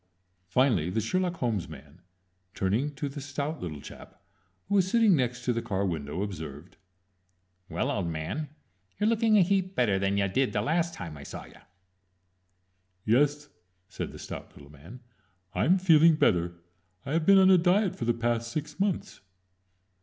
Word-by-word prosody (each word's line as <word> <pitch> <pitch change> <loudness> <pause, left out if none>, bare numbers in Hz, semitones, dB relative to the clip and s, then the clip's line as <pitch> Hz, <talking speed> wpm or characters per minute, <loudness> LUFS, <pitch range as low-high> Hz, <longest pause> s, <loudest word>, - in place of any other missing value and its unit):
Finally 105 - +2
the 95 - -1
Sherlock 180 - -1
Holmes 115 - -2
man, 75 +3 -13 0.5
turning 120 +10 -1
to 145 - -3
the 140 +1 -7
stout 145 +3 -4
little 80 -5 -5
chap, - - -13 0.5
who 200 - -3
was 190 -2 +3
sitting 225 -3 +4
next 125 -3 -2
to 125 - +2
the 115 - -2
car 100 -4 -2
window, 80 0 -3
observed: 80 -4 -8 0.9
"Well, 140 - -1
old 100 -10 -2
man, 85 - -4 0.5
you're 210 - +2
lookin' 225 -1 +3
a 195 - +6
heap 190 +1 0
better 105 -6 +2
than 100 +1 0
ya 100 - +2
did 125 +7 0
the 105 - +1
last 165 +5 0
time 80 -4 -7
I - - -10
saw - - -8
ya." - - -17 1.5
"Yes," 145 +5 +2 0.4
said - - -5
the - - -11
stout - - -9
little 70 0 -14
man, 80 - -13 0.5
"I'm 175 - +3
feeling 165 -3 +5
better. 85 - +2 0.5
I've 155 +3 -1
been 195 0 +8
on 190 0 +6
a 185 - +6
diet 185 +3 +2
for 115 - -4
the 120 - +2
past 115 0 -1
six 150 +3 -5
months." 195 -2 -2
125 Hz, 170 wpm, -28 LUFS, -, 1.5 s, been